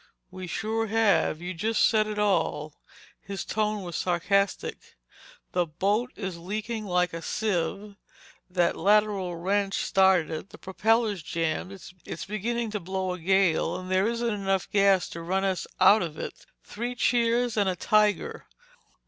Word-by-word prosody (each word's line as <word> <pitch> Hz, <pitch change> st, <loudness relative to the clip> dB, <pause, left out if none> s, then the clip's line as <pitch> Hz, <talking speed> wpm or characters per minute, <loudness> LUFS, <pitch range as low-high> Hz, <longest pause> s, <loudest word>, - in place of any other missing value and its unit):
"We 185 Hz, 0 st, -7 dB
sure 225 Hz, +4 st, -2 dB
have. 215 Hz, -7 st, +2 dB
You 180 Hz, +1 st, -4 dB
just 215 Hz, +6 st, +2 dB
said 215 Hz, -2 st, +3 dB
it 210 Hz, 0 st, -4 dB
all—" 155 Hz, -7 st, 0 dB, 0.5 s
His 195 Hz, 0 st, -6 dB
tone 215 Hz, -1 st, -1 dB
was 175 Hz, -2 st, -6 dB
sarcastic. 195 Hz, +3 st, -1 dB, 0.6 s
"The 180 Hz, -1 st, +1 dB
boat 205 Hz, +10 st, 0 dB
is 190 Hz, -5 st, -5 dB
leaking 215 Hz, +4 st, -4 dB
like 180 Hz, -1 st, +1 dB
a 165 Hz, -, -5 dB
sieve. 200 Hz, +1 st, -2 dB, 0.5 s
That 175 Hz, -1 st, +1 dB
lateral 205 Hz, -3 st, +2 dB
wrench 195 Hz, +3 st, 0 dB
started 190 Hz, -4 st, +3 dB
it. 160 Hz, +5 st, -5 dB
The -, -, -13 dB
propeller's 215 Hz, +1 st, +1 dB
jammed. 165 Hz, +5 st, -3 dB, 0.3 s
It's -, -, -6 dB
beginning 225 Hz, +3 st, -2 dB
to 210 Hz, -, -2 dB
blow 190 Hz, 0 st, -3 dB
a 180 Hz, -, -7 dB
gale 190 Hz, -1 st, +2 dB
and 185 Hz, 0 st, -7 dB
there 190 Hz, +2 st, +3 dB
isn't 235 Hz, 0 st, -1 dB
enough 195 Hz, -2 st, -1 dB
gas 195 Hz, -2 st, +4 dB
to 170 Hz, -, -7 dB
run 190 Hz, +3 st, -1 dB
us 190 Hz, -2 st, -1 dB
out 195 Hz, +4 st, +7 dB
of 160 Hz, -3 st, -4 dB
it. -, -, -7 dB, 0.2 s
Three 240 Hz, +3 st, -5 dB
cheers 240 Hz, 0 st, +2 dB
and 205 Hz, -3 st, +2 dB
a 185 Hz, -, -1 dB
tiger! 210 Hz, +3 st, +1 dB
195 Hz, 155 wpm, -27 LUFS, 180-215 Hz, 0.6 s, out